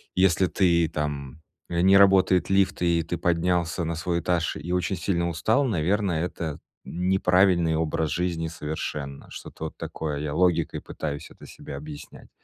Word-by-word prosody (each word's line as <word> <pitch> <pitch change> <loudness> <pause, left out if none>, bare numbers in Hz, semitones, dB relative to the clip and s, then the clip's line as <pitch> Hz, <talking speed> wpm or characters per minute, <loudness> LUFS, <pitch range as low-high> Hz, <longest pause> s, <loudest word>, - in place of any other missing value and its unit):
если 95 -1 +3
ты 85 -4 +2
там 75 -3 -4 0.3
не 90 +3 +4
работает 95 -2 +4
лифт 95 -2 +2
и 85 -1 +2
ты 85 +1 -4
поднялся 85 0 0
на 80 0 -2
свой 85 +2 -1
этаж 85 -1 0
и 80 +4 -6
очень 90 +1 0
сильно 85 -1 0
устал, 110 - +1
наверное, 90 -3 0
это 80 -4 -5 0.3
неправильный 90 -2 +2
образ 80 -1 -1
жизни 85 -2 -1
совершенно. 75 -3 -5
Что-то - - -8
вот - - -7
такое. 75 -2 -4
Я 75 0 -3
логикой 85 -3 +1
пытаюсь 75 0 -6
это - - -14
себе - - -9
объяснять. 75 0 -10
85 Hz, 150 wpm, -25 LUFS, 80-90 Hz, 0.3 s, не